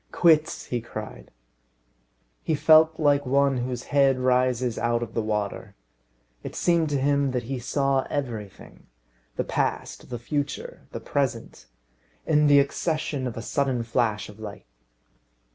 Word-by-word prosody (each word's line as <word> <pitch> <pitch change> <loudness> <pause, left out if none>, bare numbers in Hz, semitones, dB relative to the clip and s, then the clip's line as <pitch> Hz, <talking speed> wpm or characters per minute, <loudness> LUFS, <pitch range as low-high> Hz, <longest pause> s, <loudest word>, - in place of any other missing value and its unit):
"Quits!" 160 -3 +3
he 120 -1 -3
cried. 110 -2 -8 1.1
He 160 - 0
felt 160 +1 +5
like 145 -2 +3
one 140 0 +2
whose 125 0 -3
head 135 -2 +4
rises 125 -1 +1
out 120 0 0
of 115 -1 -8
the 115 - 0
water. 105 -2 -3 0.7
It - - -8
seemed 170 -3 +2
to 145 -2 0
him 140 0 +2
that 125 -1 -1
he 130 +2 -4
saw 135 +2 0
everything 115 -8 -6 0.5
the - - -1
past, - - -3
the 120 - -4
future, 140 +4 -4
the - - -5
present 120 - -3 0.6
in 150 -1 +3
the 145 -1 +6
accession 140 -1 0
of 120 - -6
a 115 - -5
sudden 135 -4 0
flash 115 -2 0
of 105 +1 -13
light. 105 -2 -9
130 Hz, 145 wpm, -25 LUFS, 120-145 Hz, 1.1 s, the